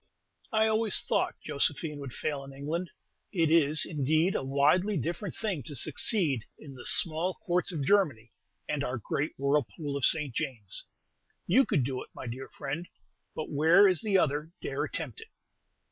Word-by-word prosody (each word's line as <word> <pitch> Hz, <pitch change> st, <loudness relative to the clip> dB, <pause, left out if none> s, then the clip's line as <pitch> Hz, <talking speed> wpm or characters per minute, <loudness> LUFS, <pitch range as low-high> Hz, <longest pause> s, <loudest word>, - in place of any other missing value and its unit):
I 220 Hz, -1 st, +3 dB
always 220 Hz, -1 st, +3 dB
thought -, -, 0 dB
Josephine 150 Hz, +1 st, 0 dB
would 140 Hz, -3 st, -6 dB
fail 145 Hz, -2 st, -3 dB
in 135 Hz, 0 st, -10 dB
England. 160 Hz, +6 st, -3 dB, 0.4 s
It 165 Hz, -5 st, +2 dB
is, 155 Hz, -2 st, +4 dB
indeed, 155 Hz, +4 st, +1 dB
a -, -, -1 dB
widely 145 Hz, +9 st, +3 dB
different 175 Hz, +3 st, -3 dB
thing 200 Hz, -9 st, -2 dB
to 145 Hz, -, -6 dB
succeed 145 Hz, -, +1 dB
in 140 Hz, -3 st, -11 dB
the 125 Hz, -2 st, -8 dB
small 170 Hz, +2 st, 0 dB
Courts 180 Hz, 0 st, +1 dB
of 155 Hz, -5 st, -3 dB
Germany, 140 Hz, -, +2 dB, 0.4 s
and 150 Hz, -2 st, -1 dB
our 125 Hz, -1 st, -2 dB
great 140 Hz, +7 st, -2 dB
whirlpool 140 Hz, +1 st, 0 dB
of 140 Hz, -, -3 dB
St. 150 Hz, -6 st, +3 dB
James. 110 Hz, -6 st, -3 dB, 0.6 s
You 255 Hz, +10 st, +4 dB
could 140 Hz, -, +2 dB
do 130 Hz, 0 st, -3 dB
it, -, -, -10 dB
my -, -, -7 dB
dear 125 Hz, +3 st, -6 dB
friend; 145 Hz, +5 st, -5 dB, 0.5 s
but 155 Hz, -, -5 dB
where 165 Hz, +7 st, +6 dB
is 185 Hz, -4 st, +2 dB
the 205 Hz, -3 st, +2 dB
other 150 Hz, -1 st, 0 dB
dare -, -, -2 dB
attempt 450 Hz, -, -5 dB
it? 445 Hz, -, -11 dB
155 Hz, 170 wpm, -29 LUFS, 140-180 Hz, 0.6 s, where